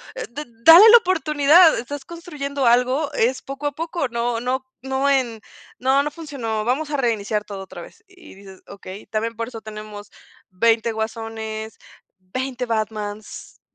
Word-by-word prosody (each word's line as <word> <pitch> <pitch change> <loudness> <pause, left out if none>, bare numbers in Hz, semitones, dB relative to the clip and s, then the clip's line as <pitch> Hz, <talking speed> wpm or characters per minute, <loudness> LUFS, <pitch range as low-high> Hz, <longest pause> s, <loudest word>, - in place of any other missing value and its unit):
eh, - - -5
de 290 +5 -6
de 240 - -23
dale 350 +7 +10
la 475 - +10
oportunidad, 325 -4 +4
estás 270 +4 -7
construyendo 285 -5 -5
algo, 255 +5 +2
es 255 +2 0
poco 275 +2 -5
a - - -1
poco, 325 -1 -3
no 235 0 -2
no 255 +2 -2 0.2
no 265 +1 0
en 250 -5 0 0.4
"No 265 +2 +2
no 295 - -3
funcionó, 255 -9 -4
vamos 280 +6 -1
a 290 - -1
reiniciar 215 -4 -1
todo 195 -2 -7
otra 190 - -10
vez", - - -14
y 370 - -16
dices: 195 -1 -14
"Okey, 195 0 -10
también 225 +1 -3
por 230 - -3
eso 230 -3 -9
tenemos 215 -1 -10 0.4
20 225 +4 +1
Guasones, 220 0 -5 0.4
20 255 +7 -4
Batmans", 215 -2 -5
245 Hz, 160 wpm, -21 LUFS, 220-285 Hz, 0.4 s, dale